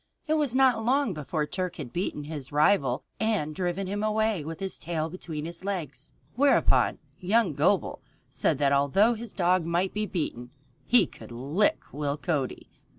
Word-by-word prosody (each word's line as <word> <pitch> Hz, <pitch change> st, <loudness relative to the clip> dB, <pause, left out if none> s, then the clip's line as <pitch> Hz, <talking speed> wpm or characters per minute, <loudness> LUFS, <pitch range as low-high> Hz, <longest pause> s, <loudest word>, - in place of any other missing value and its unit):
It 310 Hz, -, +1 dB
was 295 Hz, -5 st, +1 dB
not 255 Hz, -4 st, +4 dB
long 260 Hz, -2 st, +2 dB
before 150 Hz, 0 st, -2 dB
Turk 180 Hz, +2 st, -3 dB
had 140 Hz, -7 st, -7 dB
beaten 175 Hz, -4 st, -2 dB
his 145 Hz, -3 st, -7 dB
rival 145 Hz, -4 st, +3 dB, 0.2 s
and 210 Hz, -9 st, 0 dB
driven 180 Hz, +3 st, -2 dB
him 200 Hz, +2 st, -3 dB
away 215 Hz, -4 st, +1 dB
with 160 Hz, +1 st, -6 dB
his 195 Hz, -1 st, -3 dB
tail 160 Hz, -1 st, -3 dB
between 160 Hz, -4 st, -6 dB
his 170 Hz, +2 st, -5 dB
legs. 180 Hz, -8 st, -4 dB, 0.2 s
Whereupon 280 Hz, +3 st, +3 dB, 0.2 s
young 200 Hz, -1 st, +2 dB
Gobel -, -, +1 dB, 0.3 s
said -, -, +1 dB
that 140 Hz, 0 st, +2 dB
although 140 Hz, -, +4 dB
his 230 Hz, -1 st, -6 dB
dog 180 Hz, -1 st, +2 dB
might 175 Hz, +3 st, 0 dB
be 210 Hz, 0 st, -1 dB
beaten, 125 Hz, -, -3 dB, 0.4 s
he 235 Hz, -5 st, +5 dB
could -, -, -13 dB
lick 140 Hz, -, +1 dB
Will 145 Hz, 0 st, -2 dB
Cody. 145 Hz, -5 st, -3 dB
180 Hz, 165 wpm, -27 LUFS, 150-215 Hz, 0.4 s, he